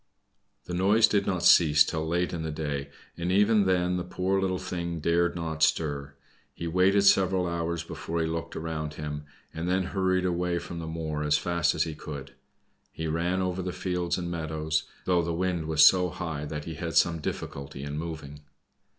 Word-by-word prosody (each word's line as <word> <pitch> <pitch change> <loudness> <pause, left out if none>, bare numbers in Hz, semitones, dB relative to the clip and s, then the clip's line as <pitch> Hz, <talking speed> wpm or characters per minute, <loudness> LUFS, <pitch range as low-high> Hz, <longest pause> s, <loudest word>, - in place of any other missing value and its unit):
The 90 - -6
noise 100 +5 +4
did 100 -2 +1
not 90 -3 0
cease 75 -3 +7
till 80 -1 -3
late 90 +2 0
in 85 - -3
the 80 - -3
day, 75 -2 -3 0.3
and 85 +1 -2
even 105 +1 +4
then 90 -1 +2
the 90 - -2
poor 95 +2 -1
little 95 -1 0
thing 85 -2 -4
dared 85 +2 +1
not 80 -2 -4
stir. 70 -3 +1 0.4
He 85 - -5
waited 95 +4 +3
several 95 -2 +4
hours 85 -1 -2
before 85 0 -4
he 80 - +1
looked 80 +1 -4
around 75 -2 -4
him, 75 -1 -5 0.3
and 85 +2 -3
then 95 +1 +2
hurried 95 0 0
away 90 -1 0
from 85 0 -6
the 80 - -5
moor 80 -2 -3
as 75 -1 +3
fast 85 +3 +1
as - - +2
he 80 - -4
could. 75 -2 -8 0.6
He 80 - -5
ran 85 +4 0
over 90 0 -2
fields 90 -1 -2
and 85 -1 -4
meadows, 80 -2 -2 0.2
though 90 -2 +3
the 85 0 -2
wind 90 -2 -1
was 80 -1 +6
so 90 -1 +5
high 80 -3 -4
that 75 0 -5
he 80 - -5
had 80 +1 -5
some 85 -1 +3
difficulty 70 -2 -5
in 70 0 -5
moving. 75 -2 -6
85 Hz, 190 wpm, -27 LUFS, 80-90 Hz, 0.6 s, cease